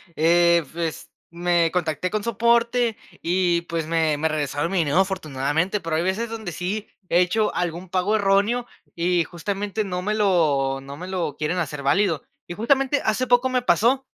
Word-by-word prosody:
eh, 170 +1 +4
pues, 165 -2 -4 0.2
me 170 -1 +1
contacté 170 -1 -1
con 215 -1 -2
soporte 235 +1 +2 0.2
y, 175 0 +1
pues, 165 -2 -3
me 160 -2 +1
me 160 - +1
regresaron 150 +1 -2
mi 190 - +1
dinero 160 +3 +2
afortunadamente, 165 0 0
pero 165 -2 -3
hay 160 - +1
veces 210 +6 -1
donde 220 -5 -5
sí 190 +6 -4 0.2
he 175 - +4
hecho 210 +4 +1
algún 175 +1 -3
pago 190 +4 +1
erróneo 210 +4 +2 0.3
y 175 0 +1
justamente 200 +5 -3
no 180 -3 -3
me 210 +3 -1
lo 155 -10 +2
no 140 +1 -9
me 180 +4 -7
lo 180 -6 -3
quieren 155 +4 -1
hacer 150 -4 -3
válido. 165 +3 +2 0.2
Y - - -5
justamente 270 +7 +1
hace 235 +4 0
poco 245 +1 +3
me 255 -1 +1
pasó 255 +3 +2
180 Hz, 175 wpm, -23 LUFS, 165-210 Hz, 0.3 s, eh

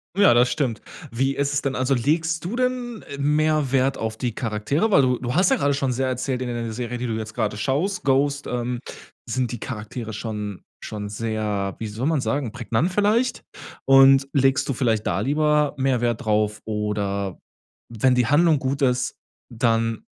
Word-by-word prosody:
Ja, 200 -8 +6
das 125 +1 +4
stimmt. 130 -8 -1 0.3
Wie 135 +3 0
ist 140 +1 0
es 140 - +1
denn, 135 - -1
also, 130 +1 +1
legst 160 +6 0
du 195 +8 -4
denn 250 -2 -2
mehr 150 0 +1
Wert 135 0 +2
auf 110 0 -3
die 120 -3 -3
Charaktere? 115 - -1
Weil 140 - +6
du 125 -1 +2
du 125 +1 -3
hast 180 +2 +4
ja - - +5
grade 140 0 +1
schon 135 -2 0
sehr 130 +2 -1
erzählt 130 0 -2
in 125 - -3
d - - -3
der 115 -1 -4
Serie, 120 +1 -4
die 125 +1 -3
du 115 - -2
jetzt 110 0 -5
grade 110 -3 -1
schaust, 145 - -1
„Ghost“, 140 +1 +1
ähm, 125 0 -2 0.5
sind 125 -2 -2
die 120 - -5
Charaktere 110 0 -6
schon 105 -2 -5 0.2
schon 105 -1 -5
sehr, 105 -2 -2
wie 115 - -5
soll 110 +6 -3
man 160 -2 +2
sagen, 140 -3 -1
prägnant 120 - -1
vielleicht? 220 +6 +1 0.4
Und 135 0 +6
legst 135 0 +2
du 135 - 0
vielleicht 115 -4 0
da 85 - 0
lieber 150 +3 +2
mehr 130 -2 +1
Wert 120 -2 -1
drauf? 105 0 +1
Oder 100 -3 -2 0.5
wenn 120 +3 +2
die 125 -2 +2
Handlung 155 +3 +4
gut 135 +1 -2
ist, 125 -2 +1 0.3
dann 115 -2 0
125 Hz, 190 wpm, -23 LUFS, 110-140 Hz, 0.5 s, Ja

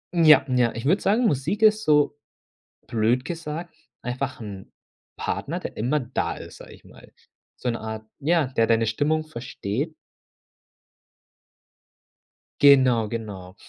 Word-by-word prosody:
Ja, 155 -5 +6
ja, 125 -3 +2
ich 115 +2 -5
würde 185 +7 +3
sagen, 225 +5 +2
Musik 165 - 0
ist 215 0 +5
so, 150 -3 +3 0.7
blöd 115 +3 +1
gesagt, 165 +1 -6 0.3
einfach 130 +1 -4
'n 100 -3 -9 0.4
Partner, - - -3
der - - -7
immer 130 +7 0
da 125 +1 -2
ist, - - -11
sage - - -12
ich - - -17
mal. - - -17 0.4
So 125 - -3
'ne 115 - -2
Art 110 0 -6
ja, 160 0 +2
der 115 -3 +1
deine 115 0 +3
Stimmung 150 +8 0
versteht. 130 0 -4 2.7
Genau, 130 -6 +6
genau. 100 -5 -7
130 Hz, 130 wpm, -24 LUFS, 115-155 Hz, 2.7 s, Ja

